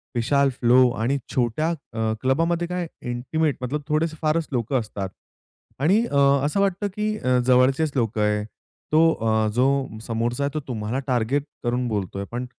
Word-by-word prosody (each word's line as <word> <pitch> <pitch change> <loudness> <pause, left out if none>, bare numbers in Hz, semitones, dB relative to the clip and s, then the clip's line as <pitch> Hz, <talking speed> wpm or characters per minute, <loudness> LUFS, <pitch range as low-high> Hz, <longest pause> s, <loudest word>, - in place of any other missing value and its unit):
विशाल 140 +4 +2
flow 125 +1 +5
आणि 130 +5 +1 0.2
छोट्या 130 +5 +1
अ, 115 -9 -3
क्लबामध्ये 165 +6 +1
काय 180 -1 -3 0.2
इंटिमेट, 140 +3 -1 0.2
थोडेसे 155 +1 0
फारच 155 +1 +1
लोकं 125 +1 0
असतात. 100 -4 -5 0.7
आणि 190 - +3
अ, 140 - +1 0.3
असं 150 +7 0
वाटतं 195 +1 +1
की 215 0 -1
अ, 125 -8 +1
जवळचेच 130 +4 +3
लोक 115 -4 0
आहे. 105 0 +1 0.5
तो 155 +1 +5
अ, 110 -3 +1
जो 125 +3 +3 0.4
समोरचा 120 +3 -1
आहे 140 -1 -1
तो 155 - -1
तुम्हाला 115 0 -3
टार्गेट 125 +2 +1 0.2
करून 125 +1 0
बोलतोय. 100 -3 -3
पण 120 +1 -3
130 Hz, 150 wpm, -23 LUFS, 115-155 Hz, 0.7 s, flow